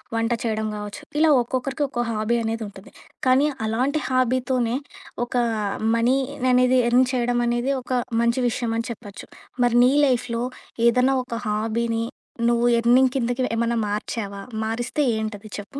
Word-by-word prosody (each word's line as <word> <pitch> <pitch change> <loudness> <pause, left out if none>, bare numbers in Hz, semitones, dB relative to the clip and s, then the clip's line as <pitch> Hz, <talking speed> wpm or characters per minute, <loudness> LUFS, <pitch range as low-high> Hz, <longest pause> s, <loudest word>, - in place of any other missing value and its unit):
వంట 225 0 0
చేయడం 220 -2 -1
గావచ్చు 210 -1 -7 0.2
ఇలా 320 0 +5
ఒక్కొక్కరికి 265 +4 -2
ఒక్కో 240 -2 -2
హాబీ 220 +2 0
అనేది 225 0 -2
ఉంటది. 195 0 -13 0.4
కానీ, 265 +3 +4 0.2
అలాంటి 260 +7 0
హాబీతోనే, 255 -2 +1 0.5
ఒక 245 - -11 0.6
మనీ 235 +3 +3 0.4
అనేది 255 0 +4
ఎర్న్ 250 +2 +5
చేయడం 245 -1 +1
అనేది 240 +3 0
ఒక 255 - -5 0.3
మంచి 235 +2 +1
విషయం 235 -1 -2
అని 230 - -2
చెప్పొచ్చు. 205 -3 -10 0.4
మరి 240 0 +3
నీ 250 - +5
లైఫ్‌లో 245 -2 0 0.4
ఏదన్నా 250 +3 +3
ఒక 240 -2 -6
హాబీని 225 +2 -1 0.5
నువ్వు 235 0 +2
ఎర్నింగ్ 250 +2 +4
కిందకి 245 +1 -1
ఏమన్నా 235 0 +1
మార్చావా? 205 -1 -4 0.2
మారిస్తే 240 +6 -1
ఏంటది 215 -1 -5
చెప్పు? 240 +8 -8
240 Hz, 140 wpm, -23 LUFS, 225-255 Hz, 0.6 s, ఇలా